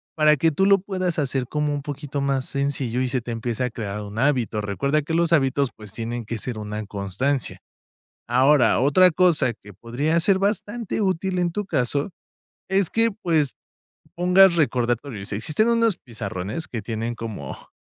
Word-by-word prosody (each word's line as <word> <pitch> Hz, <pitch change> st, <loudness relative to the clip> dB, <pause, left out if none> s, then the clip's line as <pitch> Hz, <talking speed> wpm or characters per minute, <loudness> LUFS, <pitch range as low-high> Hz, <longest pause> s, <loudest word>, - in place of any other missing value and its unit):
para 155 Hz, -1 st, +5 dB
que 165 Hz, +4 st, +3 dB
tú 190 Hz, +6 st, +1 dB
lo 200 Hz, 0 st, +5 dB
puedas 185 Hz, -3 st, -2 dB
hacer 135 Hz, -3 st, -1 dB
como 150 Hz, +1 st, -1 dB
un 145 Hz, -, -4 dB
poquito 145 Hz, 0 st, -4 dB
más 135 Hz, -1 st, 0 dB
sencillo 140 Hz, -3 st, -1 dB
y 130 Hz, -, +1 dB
se 125 Hz, 0 st, -1 dB
te 120 Hz, -, -9 dB
empiece 115 Hz, +2 st, -3 dB
a 125 Hz, -, 0 dB
crear 105 Hz, -2 st, -5 dB
un 105 Hz, +1 st, -8 dB
hábito. 125 Hz, -6 st, +1 dB
Recuerda 140 Hz, +9 st, 0 dB
que 160 Hz, -, -4 dB
los 170 Hz, 0 st, +2 dB
hábitos, 140 Hz, -3 st, +2 dB
pues, 105 Hz, -3 st, -12 dB
tienen 115 Hz, 0 st, -4 dB
que 115 Hz, +1 st, -4 dB
ser 120 Hz, -1 st, -5 dB
una 105 Hz, 0 st, -5 dB
constancia. 105 Hz, +8 st, -2 dB, 0.7 s
Ahora, 130 Hz, +1 st, +4 dB
otra 165 Hz, +8 st, +5 dB
cosa 155 Hz, -8 st, +3 dB
que 105 Hz, -1 st, -15 dB
podría 130 Hz, -, -1 dB
ser 190 Hz, +3 st, +3 dB
bastante 210 Hz, +3 st, -2 dB
útil 185 Hz, -1 st, 0 dB
en 175 Hz, -1 st, +1 dB
tu 205 Hz, +2 st, -3 dB
caso 140 Hz, 0 st, -1 dB, 0.6 s
es 190 Hz, -2 st, +2 dB
que, 230 Hz, 0 st, +2 dB
pues, 165 Hz, -, 0 dB, 0.6 s
pongas 180 Hz, +1 st, +5 dB
recordatorios. 120 Hz, -6 st, -1 dB
Existen 155 Hz, -, +1 dB
unos 230 Hz, -3 st, +3 dB
pizarrones 110 Hz, -, -5 dB
que 115 Hz, -, -5 dB
tienen 115 Hz, +2 st, -3 dB
como 110 Hz, -12 st, -7 dB
140 Hz, 170 wpm, -23 LUFS, 115-170 Hz, 0.7 s, para